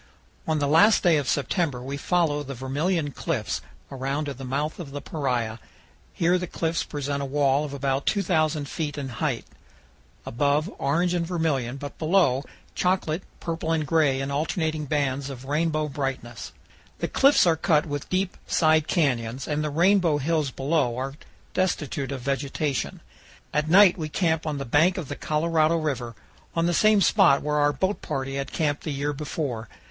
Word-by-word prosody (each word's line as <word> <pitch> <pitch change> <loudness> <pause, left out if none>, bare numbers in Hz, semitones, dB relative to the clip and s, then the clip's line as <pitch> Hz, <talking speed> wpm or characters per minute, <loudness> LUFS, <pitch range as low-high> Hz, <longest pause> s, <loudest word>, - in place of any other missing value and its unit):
On 160 -1 +1
the 145 -1 +1
last 200 +9 +5
day 170 -4 +5
of 145 -3 -1
September 145 -2 0
we 135 +3 -5
follow 155 -1 +1
the 140 -1 -6
Vermilion 145 +5 -1
Cliffs 135 -8 -2 0.3
around 135 +3 -2
to 140 - -4
the 135 +1 -10
mouth 140 +6 -2
of 165 -5 -6
the 145 +1 -5
Paria. 125 -7 -2 0.5
Here 175 +2 +2
the 180 - -4
cliffs 165 0 -1
present 140 -1 -3
a - - -2
wall 140 0 +2
of 145 - -6
about 135 0 -1
2,000 155 -7 +1
feet 150 0 -4
in 140 -2 -4
height, 120 - -2 0.8
above, 145 - +1
orange 170 +6 +1
and 175 -1 0
vermilion, 145 -8 -1
but 145 0 -8
below, 155 -6 +3 0.3
chocolate, 180 -2 0 0.2
purple, 165 -1 -3
and 160 -2 +1
gray 145 -3 +2
in 135 +1 -3
alternating 155 +1 -1
bands 140 -1 -1
of 135 -1 -8
rainbow 155 +1 0
brightness. 135 -4 -4 0.5
The - - -2
cliffs 275 -5 +5
are 170 -2 +4
cut 160 -2 +2
with 145 -2 -5
deep 185 0 -1
side 155 -2 +3
canyons, 125 -5 0
and 150 0 -1
the 150 - -1
rainbow 170 0 +3
hills 150 0 0
below 135 -2 0
are 135 +1 -3 0.4
destitute 150 -7 -1
of 135 -2 -4
vegetation. 140 +1 -2 0.5
At 150 +1 0
night 185 0 +7
we 155 -1 -3
camp 160 0 0
on 150 -2 -2
the 140 - -4
bank 160 +9 +3
of 160 -7 -5
the 145 - -3
Colorado 160 +1 +1
River, 130 -7 -3 0.4
on 165 0 +2
the 175 - +1
same 215 +2 +4
spot 140 -5 +4
where 150 0 0
our 145 0 +4
boat 190 +6 -1
party 135 0 -3
had 140 0 -4
camped 145 -3 -1
the - - -4
year 145 +1 -2
before. 135 -6 -4
150 Hz, 175 wpm, -25 LUFS, 135-165 Hz, 0.8 s, night